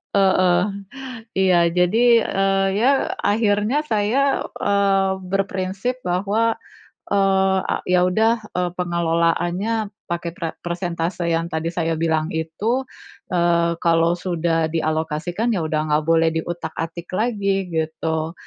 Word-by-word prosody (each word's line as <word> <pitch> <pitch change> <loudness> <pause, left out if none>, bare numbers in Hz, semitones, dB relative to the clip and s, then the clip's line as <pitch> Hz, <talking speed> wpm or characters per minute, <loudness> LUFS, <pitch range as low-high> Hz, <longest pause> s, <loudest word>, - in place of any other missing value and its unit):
Heeh. 185 -2 +4 0.7
Iya, 190 -2 +4 0.2
jadi, 180 +5 +3 0.2
eee, 195 -1 +1
ya, 240 +4 +3 0.3
akhirnya 210 +5 +1
saya 255 +2 +1
eee, 195 -1 +1
berprinsip 195 +5 -2
bahwa 205 +6 +1 0.6
eee, 195 -1 +3
a - - 0
ya 180 0 +4
udah, 220 +5 +3 0.2
eee, 180 -1 +1
pengelolaannya 175 +5 0 0.2
pakai 170 0 -3
pra 165 -2 -3 0.2
persentase 175 0 -2
yang 165 +1 -1
tadi 160 +1 -1
saya 165 -1 0
bilang 160 -1 0
itu, 205 +11 -1 0.5
eee, 170 -1 +2
kalau 165 0 +3
sudah 170 -2 -1
dialokasikan, 160 +6 -1
ya 180 - -1
udah 155 0 -1
enggak 150 +1 +2
boleh 165 0 +3
diutak-atik 165 0 -5
lagi, 200 -4 0
gitu. 160 0 -2
180 Hz, 115 wpm, -21 LUFS, 165-200 Hz, 0.7 s, Heeh